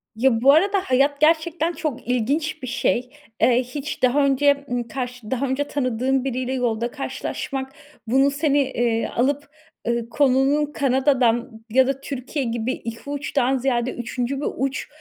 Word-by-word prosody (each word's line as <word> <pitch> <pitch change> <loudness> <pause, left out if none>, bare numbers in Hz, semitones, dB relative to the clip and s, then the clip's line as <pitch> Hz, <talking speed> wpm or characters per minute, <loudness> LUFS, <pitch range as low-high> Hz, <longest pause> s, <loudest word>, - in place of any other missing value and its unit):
Ya, 230 0 +2
bu 275 +3 +7
arada 395 +6 +3
hayat 280 +3 +2
gerçekten 325 +1 +2
çok 285 -8 -4
ilginç 280 +7 0
bir - - -4
şey. 250 0 0 0.3
Eee, 250 0 +4
hiç 270 +4 -6
daha 275 +3 +4
önce, 280 +1 +2
ımm, 245 -1 -2
karşı 245 -1 -6
daha 260 +1 0
önce 265 +2 0
tanıdığın 255 -1 0
biriyle 255 -1 -2
yolda 235 -2 -1
karşılaşmak 270 -1 -4 0.4
bunu 270 +4 +3
seni, 290 0 +1
eee, 235 -3 0
alıp, 285 +4 -1 0.4
ııı, 235 -1 -1
konunun 275 +2 +3
Kanada'dan 250 -5 +1
ya 260 +3 +4
da 270 0 -2
Türkiye 275 +1 -4
gibi 235 +1 -1
2 230 +4 -7
uçtan 275 -2 0
ziyade 250 -1 0
3'üncü 245 +3 -3
bir - - -1
uç, 270 +1 -2
265 Hz, 150 wpm, -22 LUFS, 245-285 Hz, 0.4 s, bu